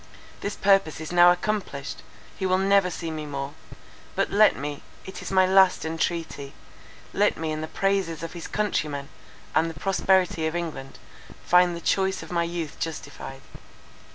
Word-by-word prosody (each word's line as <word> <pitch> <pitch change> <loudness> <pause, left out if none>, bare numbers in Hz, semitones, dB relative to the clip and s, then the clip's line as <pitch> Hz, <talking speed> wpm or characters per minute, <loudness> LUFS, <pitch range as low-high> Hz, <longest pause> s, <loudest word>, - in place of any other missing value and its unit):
This 200 - -4
purpose 195 -6 +3
is 160 +1 -6
now 175 0 +7
accomplished; 180 -7 -3 0.3
he 190 - -2
will 185 0 +3
never 195 -1 +3
see 165 -1 -5
me 155 -1 -5
more. 140 0 -4 0.6
But - - 0
let 210 +1 +5
me, 145 0 -5 0.2
it 190 - -8
is - - -6
my 190 -1 +5
last 190 -2 +4
entreaty, 160 -3 -3 0.6
let - - +2
me 160 -1 -3
in 155 0 -3
the 155 - -4
praises 190 -3 -1
of 165 - -5
his 170 -2 -7
countrymen 150 -9 -2 0.4
and 165 +1 +2
the 160 -3 -9
prosperity 190 -3 +2
of 160 - -3
England, 155 -6 -5 0.5
find 180 0 +4
the 170 - -7
choice 190 +2 0
of - - -11
my 170 -1 +1
youth 170 -3 -5
justified." 135 -4 -6
170 Hz, 165 wpm, -25 LUFS, 155-190 Hz, 0.6 s, now